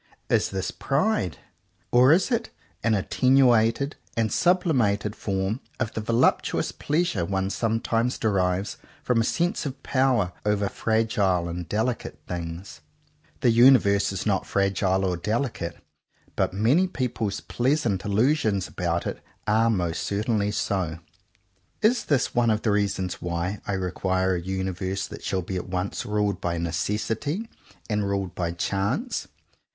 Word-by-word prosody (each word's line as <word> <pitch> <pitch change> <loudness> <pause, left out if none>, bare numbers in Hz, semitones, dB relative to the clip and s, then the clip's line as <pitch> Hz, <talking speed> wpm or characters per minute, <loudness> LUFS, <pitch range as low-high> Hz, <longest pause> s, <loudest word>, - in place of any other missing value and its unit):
Is - - +3
this 95 -1 -3
pride? 135 - 0 0.5
or 125 +3 +6
is 185 +9 +3
it 235 -1 0 0.3
an 115 -1 +3
at 100 - -3
tenuated 130 0 +4 0.2
and 110 -2 +1
sublimated 125 - +2
form 95 +3 -2 0.2
of 120 -4 -2
the 110 - -3
volup 115 +3 +3
tuous - - -2
pleasure 150 - 0
one 95 +2 -1
sometimes 115 +2 0
derives 95 -2 0 0.3
from 120 -2 +2
a - - +2
sense 175 +9 0
of 135 - -8
power 130 -9 +2
over 105 -1 +1
fragile 105 -6 +1
and 85 -1 -5
delicate 115 +4 -2
things 85 -2 -6 0.5
.f* - - -35
The 120 - +4
universe 115 -5 +5
is 95 -1 -4
not 100 -3 0
fragile 95 -1 +1
or 90 -2 0
delicate, 105 -4 -2 0.6
but - - +1
many 120 - +3
people's 115 - -2
pleasant 120 - 0
il 105 - -3
lusions 110 - +2
about 85 -1 -2
it - - -4 0.2
are 110 +2 +3
most 90 -6 0
certainly 105 0 0
so. 95 -6 -1 0.9
Is 240 +3 +3
this 145 -4 +1
one 120 -1 +3
of 110 -1 +1
the 110 - +2
reasons 100 -3 -1
why 85 +3 -2
I 100 - -1
require 95 0 0
a 90 - -1
universe 95 +1 -2
that - - -10
shall 95 -2 -1
be 95 +2 -4
at 90 - -5
once 90 +1 -3
ruled 105 -2 0
by 85 -1 -1
necessity 110 - -2 0.4
and 105 -2 0
ruled 100 -2 -2
by 85 -2 -2
chance? 100 - -1
105 Hz, 145 wpm, -25 LUFS, 95-120 Hz, 0.9 s, or